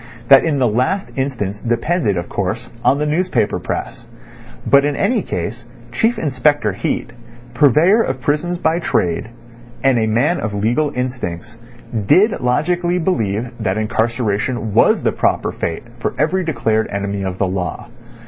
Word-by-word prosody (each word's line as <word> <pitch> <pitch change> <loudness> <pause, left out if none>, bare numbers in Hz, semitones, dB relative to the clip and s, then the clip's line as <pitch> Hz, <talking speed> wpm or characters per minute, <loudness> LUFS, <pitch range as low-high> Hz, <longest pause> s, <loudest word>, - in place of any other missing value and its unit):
That 135 -1 +8
in 155 -3 0
the 130 -2 +3
last 130 - 0
instance 120 -7 -2
depended, 120 - 0
of 85 - -3
course, 110 +5 -3
on 140 - +4
the 150 - -1
newspaper 155 - 0
press. - - -5 0.6
But 140 0 +5
in 145 0 0
any 240 - +1
case, 110 - -4 0.3
Chief 225 - +1
Inspector 145 -6 +1
Heat, 110 +4 -3 0.4
purveyor 155 - +4
of 130 -10 -2
prisons 150 +7 -1
by 165 0 +1
trade, 90 - -1 0.5
and 135 -3 +4
a 110 - +1
man 110 +2 +1
of 105 -2 -3
legal 120 +9 +1
instincts, 120 -5 -4 0.5
did 210 - +5
logically 175 +8 +1
believe 120 - -1
that 100 -2 -1
incarceration 110 0 -1
was - - +4
the - - +2
proper - - 0
fate 85 - -4 0.2
for - - -2
every 175 +5 +1
declared 115 -8 0
enemy 100 0 -3
of 95 -1 -3
the 100 - +1
law. 90 -2 -4
125 Hz, 150 wpm, -18 LUFS, 105-150 Hz, 0.6 s, That